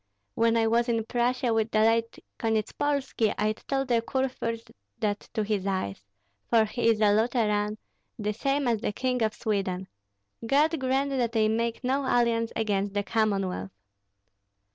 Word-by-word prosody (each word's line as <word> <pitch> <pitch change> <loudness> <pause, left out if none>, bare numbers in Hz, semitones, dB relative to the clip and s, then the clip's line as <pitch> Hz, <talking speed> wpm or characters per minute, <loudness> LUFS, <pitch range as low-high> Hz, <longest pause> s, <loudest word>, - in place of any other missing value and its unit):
When 230 0 +2
I 225 - +3
was 235 +2 +2
in 225 -2 0
Prussia 245 0 0
with 225 0 +1
the 215 - +2
late 230 +1 +2 0.2
Konyetspolski, 230 +2 0
I 215 +1 +1
told 270 +4 -3
the 235 -2 +2
kurfürst 230 -3 -3 0.3
that 205 -1 -2
to 215 - +1
his 205 -2 -1
eyes, 185 - -2 0.5
for 225 -2 +5
he 230 +2 0
is 225 -2 +2
a 205 -1 +5
Lutheran, 215 -2 +1 0.4
the 210 -2 -2
same 275 +4 0
as 230 -2 +2
the - - -2
King 250 +1 -1
of 220 -1 +1
Sweden. 190 -3 -2 0.6
God 295 +6 +2
grant 265 +2 0
that 245 -4 0
they 220 -2 +3
make 230 +3 -1
no 260 +2 +1
alliance 235 -2 +2
against 205 -2 -1
the 205 - +1
Commonwealth!" 195 - 0
225 Hz, 160 wpm, -27 LUFS, 210-245 Hz, 0.6 s, for